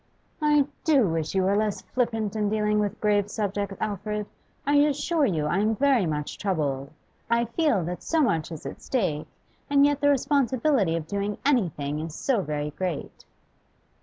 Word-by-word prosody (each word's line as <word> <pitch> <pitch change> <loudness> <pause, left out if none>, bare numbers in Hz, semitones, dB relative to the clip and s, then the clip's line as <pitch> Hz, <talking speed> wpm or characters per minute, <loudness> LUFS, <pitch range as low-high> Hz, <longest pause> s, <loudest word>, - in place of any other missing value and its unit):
'I 295 -2 +4 0.2
do 280 - +4
wish 160 0 -2
you 190 - +3
were 195 +2 +2
less 210 -1 0
flippant 225 -4 -1
in 210 -1 0
dealing 210 0 +1
with 205 0 -1
grave 205 -1 +2
subjects, 200 -2 -2
Alfred. 210 0 -3 0.4
I 285 +1 +3
assure 295 +1 +2
you 155 -7 0
I 170 +5 +1
am 215 +2 +2
very 260 -6 +3
much 150 -1 -3
troubled. 145 -8 -1 0.4
I 235 0 +2
feel 235 - +1
that 175 +2 -4
so 325 - 0
much 170 - +1
is 160 - -8
at - - -7
stake, 180 - -1 0.4
and 285 0 +5
yet 290 0 +1
the 285 - +4
responsibility 265 - +2
of 165 -2 -3
doing 200 +4 -2
anything 160 - +1
is 160 0 -5
so 250 -7 +1
very 150 -2 -3
great. 180 -1 -5
210 Hz, 170 wpm, -26 LUFS, 170-265 Hz, 0.4 s, and